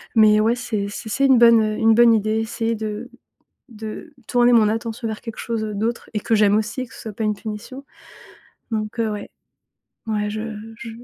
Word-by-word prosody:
mais 215 -1 +6
ouais, 225 +2 +3
c'est 225 -5 -3
c'est 220 +2 -7
c'est 275 +5 +2
une 265 -2 +6
bonne, 230 -1 +7
heu, 215 0 -1
une 225 0 +4
bonne 235 0 +6
idée, 215 0 +1
essayer 225 +1 -2
de 220 +2 -5 0.6
de 220 +7 -8
tourner 245 0 +4
mon 220 -3 +5
attention 225 +1 -3
vers 220 - -5
quelque 230 -2 -8
chose, 225 -2 -3
heu, 210 -1 -4
d'autre 230 +3 -2
et 210 - 0
que 225 - +1
j'aime 205 0 +4
aussi 220 +4 -2
et - - -6
que - - -17
ce - - -11
soit 220 - -6
pas 220 +2 -4
une 210 0 +1
punition, 230 +6 -8 0.9
donc 215 +1 -3
heu, 220 -1 0
ouais, 205 -1 -6 0.8
ouais, 210 -1 -1
je 215 - -4 0.4
je 235 -1 -7
220 Hz, 210 wpm, -21 LUFS, 215-235 Hz, 0.9 s, bonne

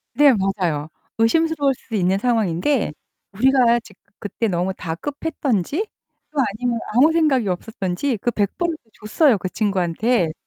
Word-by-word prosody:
네, 290 -2 +6
맞아요. 185 -7 -1 0.3
의심스러울 290 +4 +2
수 230 -2 -8
있는 190 0 +1
상황인데 220 - 0 0.4
우리가 240 +2 +3
지그 215 -4 -18 0.2
그때 210 +3 -2
너무 180 0 -1
다급했든지 280 - -2 0.4
또 300 - -12 0.2
아니면 240 -2 -1
아무 285 +7 +5
생각이 290 -9 +2
없었든지 195 +5 -2
그 240 - +1
100 200 -3 -1
불을 345 -2 -1
또 225 - -33
줬어요 220 +3 +2
그 185 - -3
친구한테. 195 -2 0
225 Hz, 315 characters per minute, -21 LUFS, 190-275 Hz, 0.4 s, 네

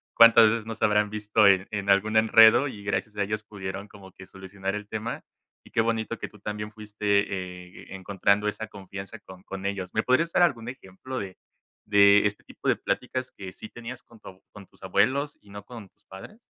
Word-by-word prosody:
cuántas 115 -1 +8
veces 115 -1 -2
no 115 - -5
se - - -6
habrán 105 0 +2
visto 105 0 +2
en 95 -1 +4
en 100 -2 -3
algún 110 +3 +2
enredo, 110 +5 +6
y 105 -6 -9
gracias 105 +1 -3
a 100 - +1
ellos 105 +2 -3
pudieron 95 -1 -7
como 95 -2 -15
que 95 - -13
solucionar 95 +1 -6
el 105 0 -6
tema. 110 +1 -5 0.4
Y - - -19
qué 115 - +2
bonito 115 0 -2
que - - -6
tú 105 - -18
también 105 +1 -5
fuiste, 105 -1 -9 0.2
eh, 90 -2 -7
e - - -6
encontrando 100 +2 0
esa 110 +1 -4
confianza 100 +2 -9
con 95 -1 -14
con 95 0 -8
ellos, 95 -2 -4
¿me 110 - 0
podrías 165 +7 +2
dar 175 - +4
algún 120 -8 0
ejemplo 130 +2 -8
de 95 -2 -7 0.5
de 100 0 +6
este 105 0 -2
tipo - - -9
de - - +4
pláticas 130 0 -3
que 95 -2 -8
sí 110 - -10
tenías 120 +2 -9
con 115 -1 -19
tu 95 -2 -13
con 100 -1 -13
tus - - -27
abuelos 130 +10 +1
y 100 - -21
no 100 0 -9
con 115 -5 -11
tus - - -39
padres? 95 - -12
105 Hz, 215 wpm, -26 LUFS, 100-115 Hz, 0.5 s, cuántas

